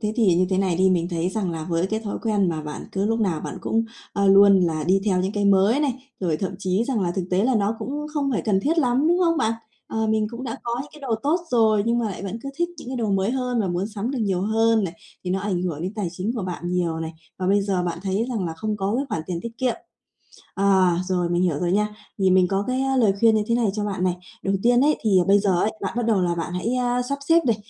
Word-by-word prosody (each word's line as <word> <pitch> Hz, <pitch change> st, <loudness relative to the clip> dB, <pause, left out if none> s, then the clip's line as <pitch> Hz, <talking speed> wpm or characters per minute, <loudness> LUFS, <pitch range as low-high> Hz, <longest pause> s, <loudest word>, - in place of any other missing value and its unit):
thế 215 Hz, -1 st, -1 dB
thì 210 Hz, -7 st, +4 dB
như 180 Hz, +2 st, +2 dB
thế 190 Hz, -, +1 dB
này 190 Hz, -3 st, +1 dB
đi, 190 Hz, +1 st, +4 dB
mình 175 Hz, -2 st, +1 dB
thấy 170 Hz, 0 st, -1 dB
rằng 190 Hz, -2 st, -2 dB
là 160 Hz, -2 st, -4 dB
với 170 Hz, +2 st, 0 dB
cái 220 Hz, +2 st, -2 dB
thói 215 Hz, -2 st, -4 dB
quen 210 Hz, -5 st, +1 dB
mà 155 Hz, -2 st, -2 dB
bạn 150 Hz, 0 st, -7 dB
cứ 195 Hz, +1 st, 0 dB
lúc 225 Hz, +1 st, 0 dB
nào 180 Hz, -7 st, 0 dB
bạn -, -, -6 dB
cũng, 225 Hz, +1 st, 0 dB, 0.3 s
ơ, 200 Hz, 0 st, +1 dB
luôn 195 Hz, 0 st, +7 dB
là 160 Hz, -3 st, 0 dB
đi 190 Hz, +3 st, +3 dB
theo 185 Hz, -3 st, +2 dB
những 190 Hz, +2 st, -1 dB
cái 205 Hz, -1 st, -1 dB
mới 200 Hz, +7 st, +4 dB
này, 280 Hz, -4 st, +1 dB, 0.3 s
rồi 170 Hz, -5 st, 0 dB
thậm 190 Hz, +2 st, -3 dB
chí 190 Hz, +3 st, 0 dB
rằng 245 Hz, -4 st, -1 dB
là 180 Hz, -2 st, 0 dB
thực 185 Hz, -2 st, -2 dB
tế 185 Hz, +3 st, +2 dB
là 255 Hz, 0 st, +2 dB
nó 210 Hz, +1 st, +1 dB
cũng 295 Hz, +2 st, -4 dB
không 280 Hz, -2 st, 0 dB
phải 230 Hz, -, -1 dB
cần 200 Hz, -3 st, +1 dB
thiết 325 Hz, +4 st, +1 dB
lắm, 265 Hz, +1 st, +2 dB
đúng 350 Hz, +1 st, +3 dB
không 330 Hz, -1 st, +2 dB
bạn? 220 Hz, -, +1 dB, 0.4 s
Ờ, 220 Hz, 0 st, -1 dB
mình 215 Hz, 0 st, +1 dB
cũng 240 Hz, +2 st, -7 dB
đã 230 Hz, -3 st, -4 dB
có 235 Hz, 0 st, -2 dB
những 295 Hz, -, -13 dB
cái 300 Hz, -, -14 dB
đồ 260 Hz, -5 st, -1 dB
tốt 315 Hz, +5 st, +1 dB
rồi 220 Hz, -3 st, +3 dB
nhưng 235 Hz, +1 st, +2 dB
mà 230 Hz, -, 0 dB
lại 190 Hz, -, -7 dB
vẫn 200 Hz, +3 st, -4 dB
cứ 275 Hz, -, -5 dB
thích 345 Hz, 0 st, +1 dB
những 245 Hz, -, -9 dB
cái 260 Hz, -, -4 dB
đồ 225 Hz, -4 st, -1 dB
mới 195 Hz, +2 st, +1 dB
hơn 250 Hz, -2 st, -1 dB
và 195 Hz, -, -1 dB
muốn 175 Hz, +3 st, -1 dB
sắm 215 Hz, +2 st, -4 dB
được 270 Hz, -, -3 dB
nhiều 195 Hz, -4 st, 0 dB
hơn 225 Hz, 0 st, +2 dB
này, 175 Hz, -2 st, -4 dB, 0.3 s
thì 180 Hz, -, -2 dB
nó 190 Hz, -, 0 dB
ảnh 185 Hz, -3 st, -1 dB
hưởng 165 Hz, -4 st, -3 dB
đến 185 Hz, +4 st, -4 dB
tài 205 Hz, -5 st, -2 dB
chính 185 Hz, +6 st, -3 dB
của 225 Hz, -, -3 dB
bạn 180 Hz, -1 st, -5 dB
nhiều 175 Hz, -3 st, 0 dB
này 160 Hz, 0 st, -4 dB, 0.3 s
và 185 Hz, -, -2 dB
bây 200 Hz, +1 st, +3 dB
giờ 195 Hz, -3 st, 0 dB
bạn 170 Hz, -1 st, -3 dB
thấy 200 Hz, +4 st, -1 dB
rằng 225 Hz, -7 st, -2 dB
là 165 Hz, -, -3 dB
không 210 Hz, +6 st, -3 dB
có 200 Hz, +1 st, -1 dB
cái 275 Hz, -, 0 dB
khoản 160 Hz, -, -2 dB
tiền 175 Hz, -2 st, -3 dB
tiết 230 Hz, 0 st, -8 dB
kiệm. 255 Hz, -2 st, +1 dB, 0.8 s
Ờ, 195 Hz, -2 st, +4 dB, 0.2 s
rồi 180 Hz, -2 st, 0 dB
mình 175 Hz, +1 st, +1 dB
hiểu 170 Hz, -6 st, +1 dB
rồi 175 Hz, 0 st, 0 dB
nha, 210 Hz, +2 st, +2 dB, 0.3 s
thì 190 Hz, -1 st, +3 dB
mình 185 Hz, -1 st, +4 dB
có 195 Hz, +1 st, 0 dB
cái, 255 Hz, +1 st, -1 dB
a, 270 Hz, 0 st, 0 dB
lời 220 Hz, -6 st, +4 dB
khuyên 225 Hz, -1 st, +5 dB
như 215 Hz, -, +2 dB
thế 230 Hz, -, +1 dB
này 235 Hz, -4 st, +2 dB
cho 210 Hz, -, -2 dB
bạn 195 Hz, -3 st, -2 dB
này. 180 Hz, -1 st, +1 dB, 0.3 s
Đầu 195 Hz, 0 st, +1 dB
tiên 245 Hz, +1 st, +4 dB
ấy 300 Hz, +2 st, +3 dB
thì 220 Hz, -, 0 dB, 0.2 s
bây 200 Hz, +1 st, +5 dB
giờ 200 Hz, -1 st, +1 dB
ấy, 215 Hz, -, +1 dB
bạn 195 Hz, -, -3 dB
bắt 240 Hz, -2 st, 0 dB
đầu 215 Hz, -5 st, +2 dB
là 175 Hz, -1 st, +1 dB
bạn 170 Hz, +1 st, -4 dB
hãy, 225 Hz, +7 st, -1 dB
ơ, 245 Hz, 0 st, 0 dB
sắp 280 Hz, 0 st, -2 dB
xếp 330 Hz, 0 st, +5 dB
này 230 Hz, -3 st, +3 dB
200 Hz, 295 wpm, -23 LUFS, 185-235 Hz, 0.8 s, luôn